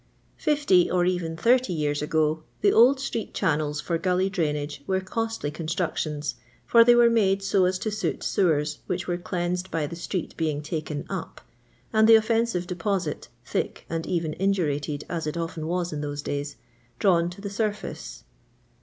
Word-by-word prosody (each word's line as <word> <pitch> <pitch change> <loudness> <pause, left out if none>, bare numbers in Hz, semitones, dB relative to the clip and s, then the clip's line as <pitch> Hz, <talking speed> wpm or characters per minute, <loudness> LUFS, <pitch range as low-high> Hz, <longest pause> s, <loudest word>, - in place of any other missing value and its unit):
Fifty, 285 - +3
or 180 -1 +2
even 175 -3 -1
thirty 240 0 +3
years 145 -2 -1
ago, 155 +1 +1 0.2
the 205 - +4
old 255 +4 +6
street 235 -4 -4
channels 150 -4 0
for 165 +2 -2
gully 185 +1 +1
drainage 150 -5 -2
were 190 0 +1
costly 225 -4 -3
construc 165 +2 -2
tions, 150 -1 -2 0.3
for 230 -1 +7
they 240 +1 +6
were 240 0 +6
made 200 -4 +2
so 195 -1 +3
as 185 +1 +1
to 215 +3 -3
suit 215 +1 -2
sewfers 155 -6 +1
which 180 0 -2
were 175 -1 -1
cleansed 180 +1 -2
by 160 -2 -1
the 160 - -6
street 175 +1 -4
being 155 -3 -1
taken 155 -2 -4
*^ - - -19
up," - - -5 0.5
and 220 0 +5
the 225 - +10
offensive 225 -4 +2
deposit, 180 -2 -2 0.2
thick - - -3
and 165 -1 -2
even 165 -3 -1
indurated 150 -7 0
as 165 -3 -3
it 150 - -3
often 165 -1 -4
was 175 -1 -1
in 150 - -3
those 145 -1 -4
days, 145 0 -3 0.4
drawn 175 -4 +3
to 175 - -11
the 200 0 -5
surface. 210 0 -4
175 Hz, 175 wpm, -26 LUFS, 155-200 Hz, 0.5 s, the